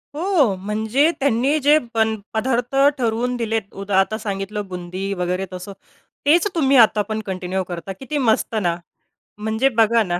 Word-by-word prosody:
हो, 310 Hz, -, +2 dB
म्हणजे 220 Hz, -, +1 dB
त्यांनी 275 Hz, +2 st, +2 dB
जे 295 Hz, +2 st, +6 dB, 0.2 s
पण 220 Hz, -1 st, +2 dB, 0.2 s
पदार्थ 245 Hz, +2 st, -1 dB, 0.2 s
ठरवून 240 Hz, 0 st, -1 dB
दिलेत 225 Hz, -3 st, -2 dB
उदा 195 Hz, -1 st, +2 dB
आता 205 Hz, +3 st, +1 dB
सांगितलं 205 Hz, -1 st, -4 dB
बुंदी 185 Hz, +2 st, -5 dB
वगैरे 180 Hz, +2 st, -1 dB
तसं, 185 Hz, +2 st, -7 dB, 0.5 s
तेच 330 Hz, +7 st, +4 dB
तुम्ही 275 Hz, -4 st, +3 dB
आता 220 Hz, -3 st, +5 dB
पण 220 Hz, 0 st, -2 dB
कंटिन्यू 190 Hz, 0 st, -3 dB
करता 175 Hz, +1 st, -6 dB
किती 295 Hz, +3 st, -4 dB
मस्त 230 Hz, -3 st, +1 dB
ना. 170 Hz, -1 st, +1 dB, 0.6 s
म्हणजे 220 Hz, +5 st, +1 dB
बघा 225 Hz, 0 st, +4 dB
ना 175 Hz, -3 st, -2 dB
220 Hz, 155 wpm, -21 LUFS, 195-255 Hz, 0.6 s, जे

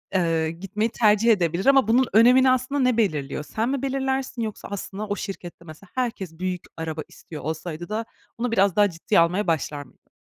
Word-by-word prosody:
eee, 165 Hz, -3 st, +1 dB
gitmeyi 195 Hz, +6 st, -2 dB
tercih 220 Hz, 0 st, +4 dB
edebilir 175 Hz, -2 st, +1 dB
ama 270 Hz, -4 st, +5 dB
bunun 250 Hz, +3 st, +4 dB
önemini 250 Hz, +4 st, +6 dB
aslında 255 Hz, +3 st, 0 dB
ne 250 Hz, -2 st, +2 dB
belirliyor? 150 Hz, -9 st, -1 dB
Sen 220 Hz, -, -2 dB
mi 275 Hz, -1 st, -1 dB
belirlersin 265 Hz, -2 st, -2 dB
yoksa 220 Hz, -2 st, -5 dB
aslında 200 Hz, +1 st, -5 dB
o 205 Hz, -, -1 dB
şirkette, 180 Hz, -4 st, -7 dB
mesela, 160 Hz, +4 st, -13 dB
herkes 210 Hz, -10 st, -3 dB
büyük 185 Hz, -1 st, -2 dB, 0.2 s
araba 160 Hz, -1 st, -4 dB
istiyor 155 Hz, -, -11 dB
olsaydı 160 Hz, +2 st, -5 dB
da 220 Hz, +2 st, -2 dB, 0.3 s
onu 245 Hz, 0 st, -2 dB
biraz 195 Hz, -4 st, +3 dB
daha 205 Hz, -1 st, +4 dB
ciddiye 165 Hz, -1 st, +1 dB
almaya 180 Hz, +4 st, +2 dB
başlar 150 Hz, -2 st, -1 dB
mıydın? 125 Hz, -, -25 dB
200 Hz, 180 wpm, -24 LUFS, 170-235 Hz, 0.3 s, önemini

